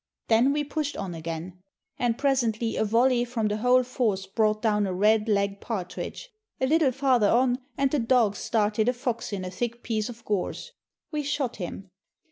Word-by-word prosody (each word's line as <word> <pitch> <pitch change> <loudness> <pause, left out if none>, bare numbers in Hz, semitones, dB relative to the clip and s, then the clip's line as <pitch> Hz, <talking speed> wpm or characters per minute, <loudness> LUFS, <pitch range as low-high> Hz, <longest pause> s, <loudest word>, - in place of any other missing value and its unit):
Then 235 +4 +5
we 295 +1 0
pushed 295 0 -3
on 195 -3 -4
again, 165 +2 -6 0.4
and 240 -1 +1
presently 235 -5 +1
a - - +1
volley 240 +3 +3
from 235 -3 -1
the 210 - -1
whole 250 +3 +4
force 230 -6 -1
brought 215 +2 +1
down 210 -2 +1
a 185 - -2
red 215 +3 +3
legged 200 -1 0
partridge; 225 - -5 0.3
a 260 - +2
little 305 -1 +3
farther 255 -5 +3
on 250 +1 +3 0.2
and 275 -1 +2
the 295 - +1
dogs 230 -4 +2
started 215 0 +1
a - - +1
fox 245 -2 -3
in 190 -2 -3
a 180 - -5
thick 235 +4 -4
piece 220 -1 -1
of 235 -1 -11
gorse. 205 -4 -2 0.4
We 300 -2 -1
shot 285 -3 -2
him. 190 +1 -7
230 Hz, 185 wpm, -26 LUFS, 205-255 Hz, 0.4 s, Then